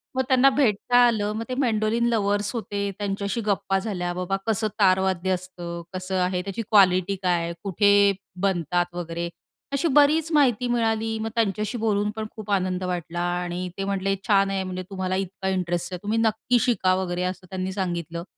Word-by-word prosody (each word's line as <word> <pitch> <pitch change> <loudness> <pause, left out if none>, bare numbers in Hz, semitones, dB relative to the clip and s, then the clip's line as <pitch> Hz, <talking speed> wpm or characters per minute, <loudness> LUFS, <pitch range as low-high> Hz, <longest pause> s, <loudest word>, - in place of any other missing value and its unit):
मग 260 - +2
त्यांना 260 +1 +5
भेटता 245 -3 +2
आलं. 210 -3 0
मग 225 +1 -3
ते 255 - -2
मेंडोलिन 230 -2 +1
लव्हर्स 205 -2 +1
होते, 200 -3 -2
त्यांच्याशी 200 +2 -2
गप्पा 195 -1 +1
झाल्या. 180 -4 -3
बाबा 180 +2 -2
कसं 220 0 +1
तारवाद्य 190 -1 +2
असतं? 175 -2 -4
कसं 185 +1 -4
आहे? 180 0 0
त्याची 195 +4 -4
क्वालिटी 195 -2 +4
काय 175 -2 +2
आहे? 170 0 -3
कुठे 200 +1 +3 0.5
बनतात? 175 -2 +1
वगैरे, 170 0 -4 0.4
अशी 280 +4 +1
बरीच 310 +3 +4
माहिती 250 -5 +3
मिळाली. 225 -2 0
मग 225 +1 -2
त्यांच्याशी 215 +1 0
बोलून 210 -2 +1
पण 220 0 -3
खूप 210 -2 -7
आनंद 185 -1 0
वाटला 175 -1 -3 0.2
आणि 175 +1 -4
ते 195 - -2
म्हटले 195 0 0
छान 195 -2 +4
आहे 195 -1 -1
म्हणजे 185 0 -5
तुम्हाला 185 -1 -2
इतका 190 0 -3
इंटरेस्ट 175 -1 -1
आहे. 180 - -4
तुम्ही 215 +2 0
नक्की 225 +2 +2
शिका 215 -6 +2
वगैरे, 180 -1 -2
असं 185 0 -4
त्यांनी 190 0 -3
सांगितलं 170 -3 -3
195 Hz, 175 wpm, -24 LUFS, 180-220 Hz, 0.5 s, त्यांना